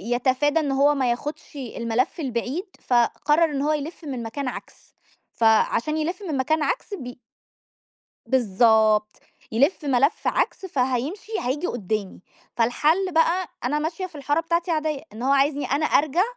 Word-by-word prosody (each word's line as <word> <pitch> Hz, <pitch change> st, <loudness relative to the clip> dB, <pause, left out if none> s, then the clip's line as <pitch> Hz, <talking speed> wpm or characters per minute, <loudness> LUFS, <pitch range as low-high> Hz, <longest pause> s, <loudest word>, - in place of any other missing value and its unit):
يتفادى 270 Hz, +5 st, +2 dB
إن 290 Hz, -3 st, -1 dB
هو 280 Hz, +2 st, +3 dB
ما 260 Hz, -3 st, +1 dB
ياخدش 295 Hz, +6 st, -6 dB
الملف 240 Hz, 0 st, -2 dB
البعيد، 265 Hz, +4 st, -2 dB, 0.2 s
فقرّر 260 Hz, +6 st, +2 dB
إن 275 Hz, -1 st, -2 dB
هو 300 Hz, +2 st, +1 dB
يلّف 305 Hz, +3 st, -5 dB
من 260 Hz, -5 st, -4 dB
مكان 260 Hz, +5 st, -4 dB
عكس، 250 Hz, -, -9 dB, 0.4 s
فعشان 230 Hz, +6 st, +2 dB
يلِفّ 345 Hz, +5 st, -2 dB
من 290 Hz, -, -1 dB
مكان 310 Hz, +4 st, +1 dB
عكس 405 Hz, -, -2 dB
بي 250 Hz, -9 st, -7 dB, 1.1 s
بالضبط 220 Hz, -3 st, +3 dB, 0.3 s
يلِفّ 280 Hz, +7 st, +1 dB
ملف 275 Hz, +3 st, +2 dB
عكس 385 Hz, -, 0 dB
فهيمشي 275 Hz, -, -2 dB
هييجي 270 Hz, +8 st, -2 dB
قدّامي، 215 Hz, -4 st, -3 dB, 0.4 s
فالحلّ 305 Hz, +11 st, +2 dB
بقى 335 Hz, +3 st, +2 dB, 0.2 s
أنا 285 Hz, +5 st, 0 dB
ماشية 325 Hz, +4 st, -3 dB
في 345 Hz, -4 st, -12 dB
الحارة 290 Hz, +2 st, 0 dB
بتاعتي 335 Hz, +1 st, -1 dB
عادية، 310 Hz, -3 st, -1 dB
إن 220 Hz, -, -9 dB
هو 270 Hz, -, +2 dB
عايزني 280 Hz, 0 st, +2 dB
أنا 285 Hz, +4 st, 0 dB
أرجَع، 310 Hz, +5 st, +3 dB
280 Hz, 145 wpm, -24 LUFS, 245-315 Hz, 1.1 s, هو